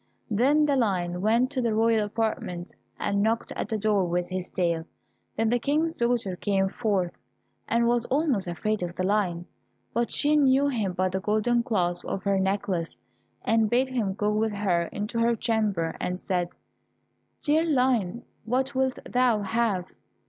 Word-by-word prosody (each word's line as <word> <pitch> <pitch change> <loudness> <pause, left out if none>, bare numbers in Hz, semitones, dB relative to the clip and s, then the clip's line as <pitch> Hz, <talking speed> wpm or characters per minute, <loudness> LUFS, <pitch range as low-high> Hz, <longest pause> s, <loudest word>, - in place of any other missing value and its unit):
Then 280 +8 +3
the 285 -2 +2
lion 180 -7 0
went 230 +6 +2
to 265 -3 -1
the 230 -3 0
royal 225 -1 +3
apartment, 210 -5 -3 0.3
and 200 0 0
knocked 225 +2 0
at - - -4
the 220 - 0
door 210 -2 +2
with 175 0 -1
his 185 -1 -4
tail. 170 -3 -1 0.5
Then 225 +1 +1
the 245 - +2
King's 310 +6 0
daughter 235 -6 0
came 195 0 0
forth, 195 -5 0 0.6
and 235 +1 +2
was 240 0 +2
almost 270 - +1
afraid 215 +5 -2
of 175 -1 -4
the 185 - -1
lion, 185 -4 0 0.5
but 235 0 0
she 295 +1 +3
knew 275 -1 +4
him 215 -8 -1
by 185 +1 0
the 190 +1 -2
golden 215 +4 +1
clasp 180 -7 -1
of 190 - -3
her 200 -1 +1
necklace, 190 -3 -1 0.5
and 225 -1 +3
bade 255 +3 +2
him 220 -7 -1
go 210 0 0
with 215 0 0
her 185 -4 +1
into 210 +3 -3
her 235 0 +3
chamber, 210 -8 0
and 180 0 -2
said, 180 -2 -1 0.9
"Dear 310 +1 +3
Lion, 250 - +1 0.2
what 260 +5 -1
wilt 260 -1 0
thou 245 -4 +2
have?" 205 -3 0
215 Hz, 170 wpm, -26 LUFS, 190-240 Hz, 0.9 s, knew